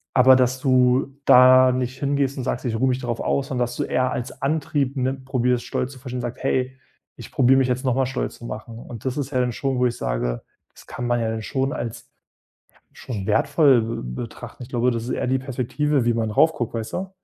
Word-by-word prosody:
Aber 130 0 +7
dass 130 0 +1
du 130 +1 +2
da 130 0 +7
nicht 125 0 -2
hingehst 140 -1 0
und 130 - -3
sagst: 125 - -2
„Ich 115 -2 -1
ruhe 130 +2 +2
mich 125 0 0
darauf 120 -2 -3
aus" 135 -1 0
sondern 125 -2 0
dass 120 0 -7
du - - 0
eher 130 0 0
als 120 +1 -5
Antrieb, 140 -1 -1
ne, 130 +1 0
probierst, 125 -2 -1
Stolz 125 - -2
zu 130 - -13
verstehen, 125 -1 -5
sagst: 120 +1 -6
„Hey, 130 0 0 0.4
ich - - -10
probiere 130 0 +4
mich 130 - +2
jetzt 125 +1 -1
nochmal 130 +1 +2
stolz 130 0 -3
zu 120 - -11
machen." 115 0 -7
Und 120 -2 -10
das 130 +1 -2
ist 140 -1 -3
ja 130 - 0
dann 125 -1 0
schon, 135 +1 -2
wo 125 - +3
ich 120 - -4
sage - - -2 0.3
das - - -16
kann 125 - -5
man 120 0 +1
ja 115 - -1
dann 110 0 -4
schon 135 +5 -2
als, 120 -2 -6 0.6
ja, - - -29 0.2
schon 105 -6 -6
wertvoll, 125 -1 +3
äh, - - -8 0.2
betrachten. 120 +1 -9
Ich 120 - -12
glaube, 125 0 +1
das 115 -1 -3
ist - - -5
eher - - -1
die 130 +1 +2
Perspektive, 135 +1 -1
wie 120 - +3
man 110 -1 -1
rauf 160 +9 +4
guckt, 120 -5 -4
weißt 110 -1 -5
du? 190 +1 -3
125 Hz, 235 wpm, -23 LUFS, 120-135 Hz, 0.6 s, Aber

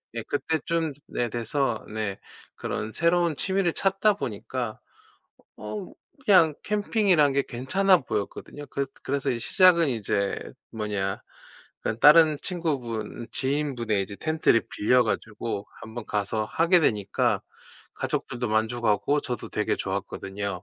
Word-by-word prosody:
예 115 - -3
그때쯤 160 +2 -1
네 120 - -2
돼서 120 +1 -1
네 105 -3 -2 0.4
그런 110 +1 -4
새로운 170 -1 +2
취미를 190 +1 0
찾다 195 +2 +2
보니까 120 - -4 0.8
어 180 - -6 0.3
그냥 180 -7 +6
캠핑이란 205 -8 +2
게 140 0 +2
괜찮아 185 +11 +3
보였거든요. 115 +5 -5
그 140 0 -2 0.2
그래서 140 +1 -1
시작은 170 +6 +4
이제 100 -4 0 0.4
뭐냐 105 -3 -2 0.6
그러니까 110 +1 -2
다른 155 0 +8
친구분 125 - -3
지인분의 130 -7 0
이제 100 +1 -7
텐트를 155 -6 +2
빌려 125 +4 +3
가지고 110 -1 -3 0.2
1 110 -1 -10
번 120 -2 -6
가서 105 +1 -1
하게 170 - +3
되니까 105 -10 +1 0.5
가족들도 120 -1 -3
만족하고 110 +5 +1
저도 125 -5 -5
되게 - - 0
좋았거든요. 95 -1 -4
125 Hz, 280 characters per minute, -26 LUFS, 110-165 Hz, 0.8 s, 다른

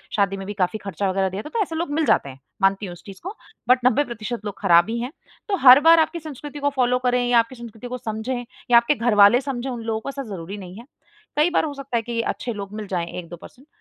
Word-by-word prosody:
शादी 195 -1 +1
में 195 - -7
भी 205 - -4
काफ़ी 195 +2 -1
ख़र्चा 195 0 -2
वग़ैरह 190 0 0
दिया 190 +2 -5
था 300 - -9
तो 455 - -1
ऐसे 330 -4 -2
लोग 330 -1 -2
मिल 315 +2 +1
जाते 140 - +2
हैं। 135 0 -12 0.2
मानती 195 +1 +2
हूँ 180 - -7
उस 175 - -15
चीज़ 195 -2 -11
को 385 +4 -6 0.3
बट 250 0 +6
90 270 +3 +4
प्रतिशत 230 -2 -6
लोग 205 -1 -6
ख़राब 175 0 +5
ही 235 +1 -2
हैं। 250 +4 -4 0.4
तो 395 - 0
हर 250 +2 +11
बार 330 0 +8
आपकी 335 +2 0
संस्कृति 295 -1 -8
को 285 - +1
फॉलो 250 -1 +2
करें 245 0 +2
या 240 -1 +5
आपकी 230 +3 -1
संस्कृति 235 0 -10
को 250 +1 -5
समझें 240 +3 -4 0.3
या 235 - +8
आपके 235 +5 +3
घरवाले 230 -1 +5
समझें, 270 -2 -4
उन 240 -2 -5
लोगों 225 -1 -2
को 275 - -6
ऐसा 275 0 -5
ज़रूरी 195 -3 -7
नहीं 185 -2 -10
है। 235 - -12 0.5
कई 305 +4 +3
बार - - +1
हो 295 - -4
सकता 275 -3 -3
है - - 0
कि 230 0 -2
अच्छे 235 +1 -3
लोग 200 -1 -7
मिल 210 -2 -6
जाएँ 175 -3 -2
1-2 175 0 -9
परसेंट 260 - -16
235 Hz, 270 wpm, -22 LUFS, 200-265 Hz, 0.5 s, हर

